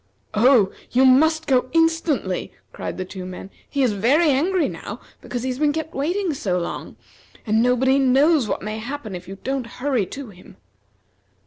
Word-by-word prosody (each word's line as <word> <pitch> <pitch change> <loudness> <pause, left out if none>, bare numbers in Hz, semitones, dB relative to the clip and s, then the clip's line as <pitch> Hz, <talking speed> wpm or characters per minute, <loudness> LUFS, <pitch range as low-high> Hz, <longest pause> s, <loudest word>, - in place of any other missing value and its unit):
"Oh! 220 -3 +4 0.2
you 260 +2 +4
must 315 +5 +4
go 255 -2 +2
instantly!" 325 - +1 0.2
cried - - -5
the 185 - -3
two 185 0 -8
men. 185 +1 -8 0.2
"He 280 -2 0
is 245 - +3
very 280 - +3
angry 340 +6 +1
now - - -7 0.2
because 245 -1 -5
he 260 - -1
has 255 +1 -4
been 300 -1 +2
kept 320 +1 -4
waiting 345 +5 -1
so 190 -9 -1
long; 175 - -5 0.5
and 220 0 +2
nobody 255 +2 +3
knows 275 +1 +4
what - - -3
may 215 +1 -4
happen 240 -2 -6
if 180 0 -8
you 195 +1 -8
don't 265 -2 -2
hurry 255 -7 0
to 275 -4 -8
him." 185 -1 -16
260 Hz, 180 wpm, -22 LUFS, 215-290 Hz, 0.5 s, Oh